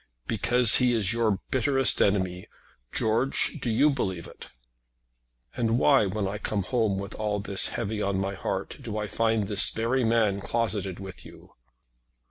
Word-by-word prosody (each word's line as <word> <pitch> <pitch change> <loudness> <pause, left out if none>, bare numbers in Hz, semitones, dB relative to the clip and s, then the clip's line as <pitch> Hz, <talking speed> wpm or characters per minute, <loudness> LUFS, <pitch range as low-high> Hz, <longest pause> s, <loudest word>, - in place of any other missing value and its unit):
"Because 115 +2 +4
he 125 -1 +2
is 110 -2 +1
your 110 -4 0
bitterest 135 0 +3
enemy. 95 -3 0 0.4
George, 115 +5 +1
do 120 - -3
you 145 +7 +3
believe 95 - -3
it?" - - -12 1.1
"And 115 0 0
why, 135 -5 +3
when 100 +1 -3
I 105 +2 -5
come 105 -2 -2
home 110 -2 -1
with 100 +1 -6
all 105 -1 -3
this 100 -1 +2
heavy 110 -2 -3
on 100 -1 -1
my 95 +1 -2
heart, 95 0 -5
do 110 -5 -6
I 105 - -2
find 110 0 -1
this 100 -1 +4
very 120 +3 -1
man 110 -4 +1
closeted 105 -5 -3
with 95 -2 -10
you?" - - -16
110 Hz, 160 wpm, -26 LUFS, 100-115 Hz, 1.1 s, Because